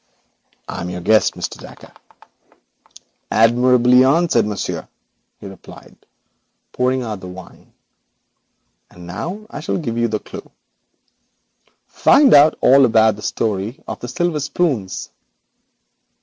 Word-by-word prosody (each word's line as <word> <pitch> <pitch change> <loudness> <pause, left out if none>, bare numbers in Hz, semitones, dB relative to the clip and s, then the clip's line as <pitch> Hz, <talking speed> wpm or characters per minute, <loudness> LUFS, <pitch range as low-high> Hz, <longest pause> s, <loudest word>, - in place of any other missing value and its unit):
'I - - -6
am 90 - -5
your 90 0 -6
guest, 110 +4 +2
Mr. - - -6
Dacre.' - - -14 1.4
'Admirably 125 +2 +4
answered, 140 -4 +2
monsieur,' 105 -2 -5 0.5
he - - -12
replied, 95 -2 -13 0.8
pouring 130 0 -1
out 110 -4 -5
the 95 - -10
wine, 90 0 -13 1.2
'and 90 0 -14
now 170 - -6
I - - -7
offer - - -4
you 120 -8 -2
a 110 - -1
clue. - - -11 1.4
Find 280 -2 +4
out 145 +2 +6
all 135 +2 +5
about 110 -2 +3
the 105 - -12
story 105 +2 -3
of - - -6
the 120 - -7
silver 160 +5 -2
spoons.' 140 - -2
120 Hz, 120 wpm, -18 LUFS, 105-140 Hz, 1.4 s, out